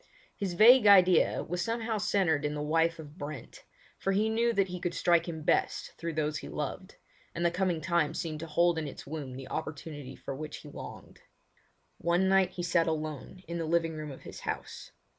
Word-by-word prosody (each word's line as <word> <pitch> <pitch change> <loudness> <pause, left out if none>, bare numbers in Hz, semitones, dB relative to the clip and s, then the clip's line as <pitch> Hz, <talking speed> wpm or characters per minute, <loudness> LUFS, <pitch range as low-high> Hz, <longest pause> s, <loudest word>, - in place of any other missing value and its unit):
His 195 -3 -3
vague 225 +3 +8
idea 185 -4 +6
was 175 +1 -3
somehow 225 +1 -1
centred 175 -8 +1
in 150 0 -1
the 150 - -3
wife 165 +2 +2
of 155 +1 -11
Brent, 145 -3 -8 0.4
for 195 - 0
he 210 +3 +2
knew 230 +2 +2
that 195 -4 +1
he 180 0 -5
could 175 -1 -3
strike 170 -1 +3
him 160 -2 -6
best - - +1
through 165 0 -3
those 155 0 -1
he - - -8
loved, 185 +6 -5 0.4
and 170 +1 -1
the 170 - +3
coming 175 -2 0
time 170 -2 +1
seemed 155 -2 -3
to 165 - -6
hold 170 +1 +2
in 155 - -3
its - - -9
womb 140 -3 -6
the 135 0 -8
opportunity 150 -3 -6
for - - -6
which 150 +2 -6
he - - -11
longed. - - -10 0.8
One 175 +2 +2
night 190 -1 +4
he 175 - -4
sat 170 -1 +2
alone 155 +3 -4
in 170 0 -4
the 165 - -2
living 165 0 +1
room 155 -1 -6
of 135 - -10
his - - -9
house. - - -5
170 Hz, 205 wpm, -30 LUFS, 155-185 Hz, 0.8 s, vague